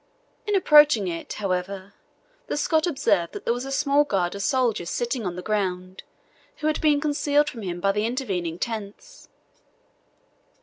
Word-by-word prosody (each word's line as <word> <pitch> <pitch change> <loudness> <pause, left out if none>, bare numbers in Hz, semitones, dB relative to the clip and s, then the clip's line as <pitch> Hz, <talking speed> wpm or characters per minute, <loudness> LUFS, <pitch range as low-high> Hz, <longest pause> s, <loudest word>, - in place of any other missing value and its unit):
In 415 - +1
approaching 295 - +6
it, 165 -1 -5
however, 195 0 -3 0.5
the - - -2
Scot 315 +2 +1
observed 200 - +1
there 235 - -1
was 245 +2 -5
a 270 - -6
small 285 +1 +3
guard 190 -10 -1
of 200 - -6
soldiers 230 -7 0
sitting 240 -3 -2
on 175 - -4
the 180 - -7
ground, 185 -3 -2 0.6
who - - -6
had 310 -1 0
been 300 -2 +3
concealed 290 0 +1
from 230 - -9
him 175 -3 -4
by 195 +2 +2
the 210 +2 0
intervening 190 -10 -3
tents. 220 - -7
215 Hz, 160 wpm, -24 LUFS, 185-290 Hz, 0.6 s, approaching